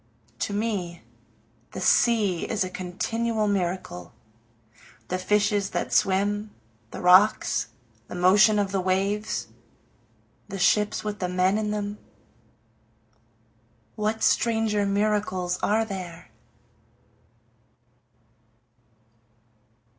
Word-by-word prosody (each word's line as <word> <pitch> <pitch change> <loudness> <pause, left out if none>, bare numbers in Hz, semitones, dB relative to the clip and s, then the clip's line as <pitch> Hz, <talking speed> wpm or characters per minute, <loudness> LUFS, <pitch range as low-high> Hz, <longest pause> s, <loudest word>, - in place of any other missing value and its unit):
To 205 - -2
me 200 -5 -3 0.7
the - - -5
sea 210 -7 +2
is 215 -4 0
a 185 - -5
continual 215 +5 -2
miracle, 175 - -3 1.0
The 185 - -1
fishes 205 +1 +1
that - - -3
swim 205 +2 +1 0.4
the - - -8
rocks 185 +4 +4 0.4
the - - -8
motion 195 +4 +5
of 200 -2 0
the 195 -1 0
waves 195 +3 -1 1.0
the 200 -1 -6
ships 210 +3 +2
with 210 -1 -4
the 180 - -2
men 185 +3 +2
in 215 -1 -2
them, 210 0 -3 2.0
What 215 +1 -2
stranger 220 -3 +2
miracles 200 -3 0
are 220 +2 +2
there? 180 -5 -8
205 Hz, 95 wpm, -25 LUFS, 185-210 Hz, 2.0 s, motion